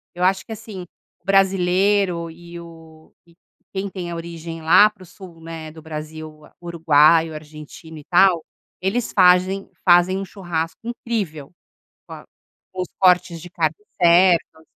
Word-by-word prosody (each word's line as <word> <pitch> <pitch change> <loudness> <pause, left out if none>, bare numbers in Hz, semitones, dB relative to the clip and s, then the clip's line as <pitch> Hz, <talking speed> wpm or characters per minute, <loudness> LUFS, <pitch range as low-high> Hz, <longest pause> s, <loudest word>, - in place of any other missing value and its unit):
Eu 180 - -3
acho 190 +1 +2
que - - -12
assim, 210 -4 -9 0.4
brasileiro 190 -2 +2
e 170 +1 -12
o 165 -2 -15 0.6
quem 195 0 -3
tem 180 -2 -7
a - - -5
origem 165 -1 -8
lá 185 +6 +6
pro 210 -3 -17
sul, 180 -1 -14
né, 160 -1 -8
do 160 +1 -13
Brasil, 155 0 -9 0.2
uruguaio, 165 -1 +3
argentino 155 +1 -11
e - - -13
tal. 180 -2 +3 0.4
Eles 210 +6 -2
fazem 185 +1 +3 0.2
fazem 175 +1 +4
um 195 - -5
churrasco 170 -4 -5
incrível 205 - -4 0.6
com - - -10
a - - -11 0.5
com 185 - -4
os 180 - -4
cortes 180 -3 +3
de 175 - -11
carne 160 -3 -1 0.3
certo. 170 -2 +3
175 Hz, 140 wpm, -21 LUFS, 160-190 Hz, 0.6 s, lá